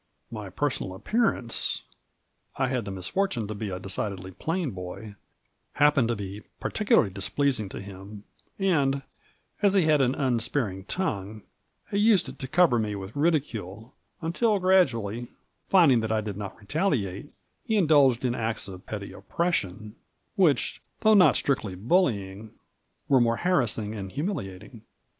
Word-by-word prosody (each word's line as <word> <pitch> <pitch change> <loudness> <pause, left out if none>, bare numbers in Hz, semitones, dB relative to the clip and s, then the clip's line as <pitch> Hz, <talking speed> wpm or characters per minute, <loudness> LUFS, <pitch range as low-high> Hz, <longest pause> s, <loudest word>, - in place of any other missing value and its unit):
My 105 -3 -6
personal 95 -4 -2
appearance— 210 - 0 0.7
I 130 -1 +1
had 125 -4 -1
the 100 - -5
misfortune 115 - -1
to 110 - -4
be 105 0 -4
a 90 -1 -4
decidedly 95 -1 -3
plain 165 - -2
boy 95 +3 -8 0.3
— - - -30
^happened 145 -4 +4
to 120 - 0
be 100 0 -6 0.2
particularly 205 - +2
displeasing 110 +2 0
to - - -7
him, 100 +1 -10 0.3
and, 140 -8 +1 0.6
as 200 -1 +4
he 190 - +5
had 155 -2 +4
an 130 0 +2
unspar 120 -3 0
ing 95 0 -10
tongue, 105 - -3 0.5
he 200 - +1
used 210 -3 +4
it - - -9
to 130 - -5
cover 155 -4 +4
me 105 -2 -2
with 95 +1 -8
ridicule, 125 - -1 0.3
until 205 +6 +1
gradually, 125 - +2 0.4
finding 160 -11 +6
that 110 -1 -2
I 110 -1 +1
did 105 -2 -5
not 100 -1 -6
retaliate, 115 - -1 0.3
he 220 - -1
indulged 145 - +4
in 120 - +1
acts 115 -3 -2
of 95 -2 -10
petty 100 -2 -5
oppression, 105 - -2 0.4
which, 175 -9 +2 0.2
though 220 -1 +5
not 180 -7 +6
strictly 115 -9 0
bully 110 - +1
ing, 105 +3 -12 0.5
were 130 -3 +5
more 115 -1 +2
harassing 120 - 0
and 100 -3 -6
humiliating. 115 - -5
115 Hz, 150 wpm, -27 LUFS, 100-155 Hz, 0.7 s, finding